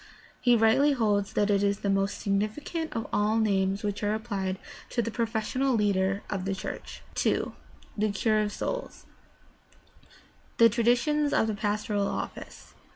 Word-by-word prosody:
He 245 -2 +4
rightly 245 +6 +4
holds 205 -5 +1
that 205 0 +2
it 200 -1 +3
is 200 0 +1
the - - -2
most 195 +1 0
significant 215 +11 -2
of 225 - -2
all 210 +1 +2
the 225 - +3
names 195 -1 +1
which 205 -1 -2
are 210 0 +1
applied 200 -4 -3 0.3
to - - -3
the 230 - -3
professional 235 +3 0
leader 200 -2 +1
of 190 -2 -3
the 195 0 -1
church. - - -7
2. - - 0 0.4
THE 215 0 +1
CURE 215 +1 +2
OF 210 -1 -1
SOULS - - -5 1.5
The 230 0 +7
traditions 245 +6 +2
of - - +3
the 220 - -1
pastoral 205 -1 -1
office. - - -6
215 Hz, 160 wpm, -28 LUFS, 200-230 Hz, 1.5 s, The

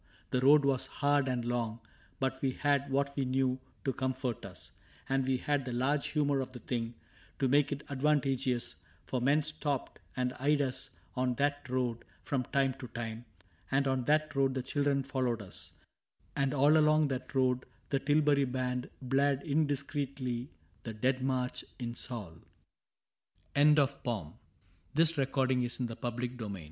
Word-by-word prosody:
The 125 - +2
road 145 +2 +6
was 135 -2 +1
hard 145 -1 +2
and 125 -2 -1
long, 120 -2 -1 0.4
But 130 0 -1
we 130 -2 +1
had 140 -1 +1
what 140 +1 0
we 140 - +1
knew 130 0 +1 0.3
to 135 - +1
comfort 130 -2 -2
us, - - -11 0.4
And 135 0 +1
we 130 -1 +2
had 145 +1 0
the 125 -1 -4
large 140 +4 +1
humor 145 -2 +1
of 130 -1 -4
the - - -6
thing 115 -1 -3 0.4
To 135 - +2
make 145 +2 +3
it 145 0 -3
advantageous; 135 -3 +1 0.3
for 125 - -2
men 145 +4 +3
stopped 150 -3 -2 0.2
And 125 0 0
eyed 145 +2 +3
us 135 -3 0 0.3
on 125 -1 +1
that 145 -1 0
road 125 -2 -1 0.2
from 130 -3 -1
time 135 0 +1
to 130 - -6
time, 115 0 -5 0.4
And 135 +1 +2
on 130 -2 0
that 155 0 +2
road 135 -1 +2
the 130 - -1
children 140 0 +1
followed 130 -3 -1
us; 95 - -6 0.6
And 135 -1 +1
all 145 +3 +5
along 155 -1 +4
that 130 0 -4
road 130 -1 +2 0.3
the 135 - +2
Tilbury 145 -1 +3
Band 125 -1 -2
Blared 135 +1 +2
indiscreetly 140 -4 -1 0.3
the 115 -2 -6
Dead 130 +4 +1
March 130 -1 -1
in 120 -2 -4
SauL 115 -7 -5
ISAAC 80 - -17 1.1
AND 150 +1 +6
ARCHIBALD 125 - 0 0.6
Isaac 155 -5 +2 0.3
and 120 -2 -3
135 Hz, 155 wpm, -32 LUFS, 125-140 Hz, 1.1 s, road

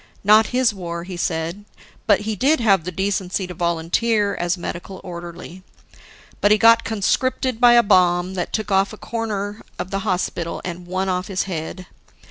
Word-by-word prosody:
Not 215 +2 +6
his 250 -3 +2
war, 170 -3 -5
he 185 0 -7
said; 170 +3 -3 0.4
but 205 -2 +4
he 215 +1 -3
did 275 - +2
have 195 -8 +3
the 180 - -3
decency 190 0 -2
to 180 - -8
volunteer 175 +6 0
as 175 +1 -1
medical 175 +2 -6
orderly. 175 0 -9 0.8
But 205 - +4
he 210 - +5
got 230 +1 +6
conscripted 245 +3 -1
by 240 -1 +7
a 240 0 +6
bomb 180 -2 +3
that 180 -2 -3
took 215 -2 -3
a 195 0 +5
corner 210 -3 -4 0.2
off 185 - -5
the 195 - -1
hospital 180 -4 -2
and 175 0 -6
one 185 +2 -2
off 180 0 -1
his 190 -3 -1
head. 180 0 -5
190 Hz, 170 wpm, -21 LUFS, 175-215 Hz, 0.8 s, by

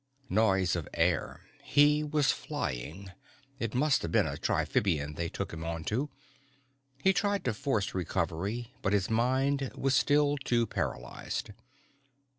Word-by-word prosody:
Noise 95 -3 +3
of 85 - -5
air, - - +1 0.2
he 150 +1 +4
was 150 -3 +2
flying, 80 +10 -4 0.5
it 115 -1 -3
must 145 +2 +3
have 85 - -3
been - - +4
a - - -3
triphibian 75 -7 0
they 85 +1 -2
took - - -5
him 80 0 -6
onto. 85 - -2 1.0
He 190 - +5
tried 200 +1 0
to 125 - +1
force 110 -4 -1
recovery 100 +6 -2
but 100 - 0
his 100 +1 +1
mind 130 +4 +1
was 135 0 +1
still 145 +1 +3
too 120 -3 +1
paralyzed. 60 - -4
115 Hz, 135 wpm, -30 LUFS, 90-140 Hz, 1.0 s, He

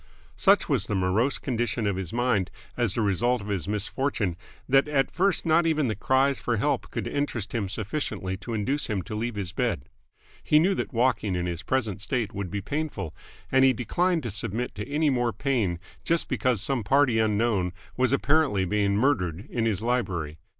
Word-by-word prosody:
Such - - +4
was - - 0
the 105 - -1
morose 95 +9 +2
condition 120 -3 -1
of 100 -2 +1
his 95 -2 -4
mind 115 -6 +1 0.3
as 120 -5 0
the 115 - +1
result 120 +5 +2
of 100 0 -8
his 95 -4 -2
misfortune 105 -1 -1 0.3
that 135 +2 +4
at 140 -2 +1
first 190 +1 +1
not 165 +1 +4
even 155 -5 +2
the 110 - -1
cries 130 +5 +2
for 120 -2 -1
help 105 - 0
could - - -4
interest 130 -7 -2
him 105 -5 -1
sufficiently 105 -3 -3
to 115 +3 -5
induce 135 +8 -1
him 100 -4 -2
to 110 - -7
leave 115 +2 -2
his 95 -4 -3
bed. 65 - -1 0.6
He 150 - +4
knew 180 +6 +4
that - - -3
walking 115 -5 +1
in 90 0 -1
his 85 -1 -3
present 110 -7 -1
state 115 -1 -1
would 100 -2 -4
be 100 +2 -3
painful, 110 - -3 0.4
and 130 0 +5
he 135 -1 +6
declined 170 +8 0
to 115 - -3
submit 115 +3 -3
to 105 +6 -6
any 150 +1 +2
more 120 -2 +1
pain 110 -7 0 0.3
just 170 0 +1
because 125 -6 0
some 130 -2 0
party 130 0 +3
unknown 105 -4 +1 0.2
was 130 0 +2
apparently 140 -8 +2
being 100 +1 +1
murdered 100 - +1
in 115 -2 0
his 105 -1 -1
library. 90 -11 -1
115 Hz, 190 wpm, -26 LUFS, 100-135 Hz, 0.6 s, he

